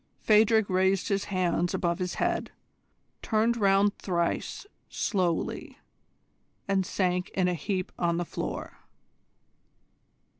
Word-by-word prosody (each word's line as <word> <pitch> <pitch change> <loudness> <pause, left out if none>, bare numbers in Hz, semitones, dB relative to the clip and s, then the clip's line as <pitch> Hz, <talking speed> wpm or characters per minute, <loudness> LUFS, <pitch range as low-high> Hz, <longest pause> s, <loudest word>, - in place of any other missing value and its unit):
Phadrig 220 0 +4
raised 190 0 +1
his 200 -1 0
hands 175 -2 0
above 170 -1 -1
his 180 -1 -2
head, 345 -1 -1 0.7
turned 225 +1 +1
round 200 -2 +3
thrice 170 - -2 0.2
slowly, 180 -5 -1 0.9
and 195 -2 +1
sank 180 0 0
in 185 -2 +2
a 180 - +1
heap 185 +3 -3
on 170 -1 +1
the 175 - -1
floor. - - -5
190 Hz, 110 wpm, -28 LUFS, 180-205 Hz, 0.9 s, Phadrig